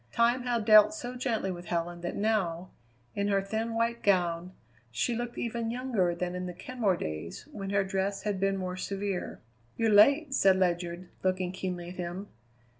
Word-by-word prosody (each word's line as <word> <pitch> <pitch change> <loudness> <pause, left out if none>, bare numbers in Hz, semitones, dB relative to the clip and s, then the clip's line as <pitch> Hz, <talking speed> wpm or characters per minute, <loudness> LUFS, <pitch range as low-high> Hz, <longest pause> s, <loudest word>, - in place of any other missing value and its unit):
Time 235 - +3
had 240 -3 -1
dealt 215 +5 +7
so 250 -4 -6
gently 230 -6 -1
with 175 -1 -7
Helen 170 0 -2
that 175 - -4
now, 190 -5 0 0.4
in 200 0 -1
her 200 -1 +3
thin 220 +3 -3
white 230 +1 0
gown, 180 -2 +1 0.4
she 120 - -1
looked 240 +1 -4
even 235 -1 -2
younger 230 -8 0
than 180 +1 -3
in 180 0 -4
the 180 - -6
Kenmore 210 -2 -1
days, 80 +1 -6
when 195 -2 -5
her 200 0 +2
dress 195 +1 -2
had 205 -3 -1
been 195 0 +1
more 185 -1 -3
severe. 195 0 -4 0.4
"You're 225 -1 +2
late," 275 +8 +6
said 195 -7 +5
Ledyard, 175 -1 -1
looking 185 -1 0
keenly 180 -2 -4
at 180 - -10
him. 180 +3 -5
195 Hz, 180 wpm, -29 LUFS, 180-225 Hz, 0.4 s, dealt